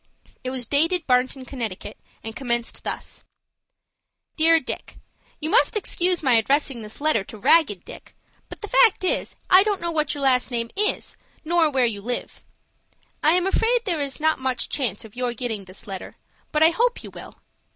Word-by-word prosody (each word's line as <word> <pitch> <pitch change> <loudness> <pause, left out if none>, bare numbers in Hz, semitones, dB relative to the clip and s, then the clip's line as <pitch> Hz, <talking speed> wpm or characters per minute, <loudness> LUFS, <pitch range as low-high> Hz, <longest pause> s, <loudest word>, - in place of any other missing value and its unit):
It 255 - -3
was 255 -2 -3
dated 325 +6 +2
Barnton, 255 +1 +1
Conn., 255 0 -8 0.6
and 225 0 -6
commenced 240 -3 -2
thus,— - - -6 1.1
"DEAR 325 +1 +5
DICK,—You 315 0 -8
must 460 -1 +3
excuse 360 -3 0
my 260 -3 +4
addressing 270 +1 +1
this 215 +5 -10
letter 305 -9 +2
to 215 - -10
'Ragged 210 - +3
Dick'; - - -12 0.3
but - - -10
the 420 - -5
fact 450 -4 +4
is, 370 - -1 0.2
I 370 +1 +9
don't 410 -1 0
know 340 0 -2
what 305 -2 -1
your 285 - -5
last 255 -2 +3
name 235 -2 -2
is, 420 +2 -1 0.3
nor 335 -1 +3
where 265 -3 +2
you 210 -4 -3
live. 245 +4 -5 0.8
I 310 - +4
am 360 0 +2
afraid 460 +5 +2
there 340 -7 0
is 280 0 -3
not 315 -1 +2
much 260 -2 -2
chance 225 -7 -2
of 220 - -15
your 245 -1 -2
getting 220 -4 -4
this 185 +1 -13
letter; 195 -2 -7 0.4
but 305 +1 +3
I 320 - +7
hope 485 +7 0
you - - -9
will. - - -11
280 Hz, 180 wpm, -23 LUFS, 240-340 Hz, 1.1 s, I